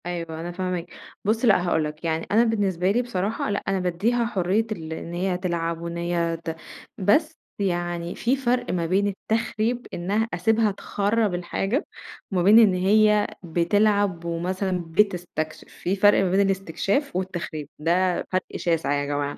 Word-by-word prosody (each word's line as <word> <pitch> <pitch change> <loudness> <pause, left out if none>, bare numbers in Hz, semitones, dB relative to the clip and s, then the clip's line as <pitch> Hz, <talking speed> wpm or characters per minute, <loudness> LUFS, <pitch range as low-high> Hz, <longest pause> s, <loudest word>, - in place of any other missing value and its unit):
أيوة 165 -2 -4
أنا 175 +1 -5
فاهماك، 180 -1 -3 0.4
بُصّ 220 +4 +1
لأ 190 -5 +4
هاقول 160 -2 +2
لَك، 150 +1 -6
يعني 160 0 -1
أنا 220 +3 +5
بالنسبة 195 -5 +1
لي 240 +4 +2
بصراحة، 215 -3 -2
لأ 200 - -1
أنا 195 -1 +1
بادّيها 205 +7 0
حرية 200 0 +1
ال 160 -6 -4
إن 170 +1 -7
هي 180 +1 -1
تلعب 170 -2 -2
وإن 170 0 -5
هي 170 -1 -1
ت 165 - -3 0.4
بس 305 - +2 0.2
يعني 175 -2 -2
في 245 +3 +1
فرْق 250 -2 0
ما 170 -2 -1
بين 195 +4 +2
التخريب، 225 +3 -1
إنها 205 +6 0
أسيبها 220 +4 +2
تخرَّب 205 +1 0
الحاجة، 195 - -1 0.5
وما 180 -2 +1
بين 210 +5 +8
إن 215 -5 +6
هي 210 +3 +4 0.2
بتلعب 185 +1 +1
ومثلًا 180 +2 -2
بتستكشف، 165 -4 -1
في 185 - -3
فرْق 205 +1 +5
ما 185 - 0
بين 190 - +3
الاستكشاف 195 - 0
والتخريب 170 -5 -4
ده، 175 +3 +1
فرق 185 0 0
شاسع 165 -4 0
يا 145 0 0
جماعة، 145 0 -2
185 Hz, 160 wpm, -24 LUFS, 170-210 Hz, 0.5 s, بين